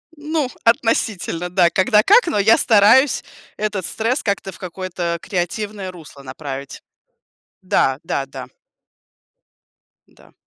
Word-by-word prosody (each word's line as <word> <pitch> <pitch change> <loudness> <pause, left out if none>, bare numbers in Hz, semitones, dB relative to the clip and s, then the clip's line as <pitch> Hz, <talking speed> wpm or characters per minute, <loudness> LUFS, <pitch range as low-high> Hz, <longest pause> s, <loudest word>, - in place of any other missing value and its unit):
Ну, 300 -2 -2
относительно, 220 -6 0
да. 180 -1 +3
Когда 210 +4 +3
как, 425 +1 +5
но 210 - -1
я 215 +3 +5
стараюсь 230 +5 +4 0.3
этот 205 -4 -2
стресс 230 - -1
как-то 200 -2 -2
в 185 - -14
какое-то 175 -1 -4
креативное 195 +2 -4
русло 155 -5 -13
направить. 135 0 -8 0.8
Да, 135 -7 +1
да, 140 -4 -2
да. 135 - -9 1.6
Да. - - -23
190 Hz, 115 wpm, -19 LUFS, 170-225 Hz, 1.6 s, как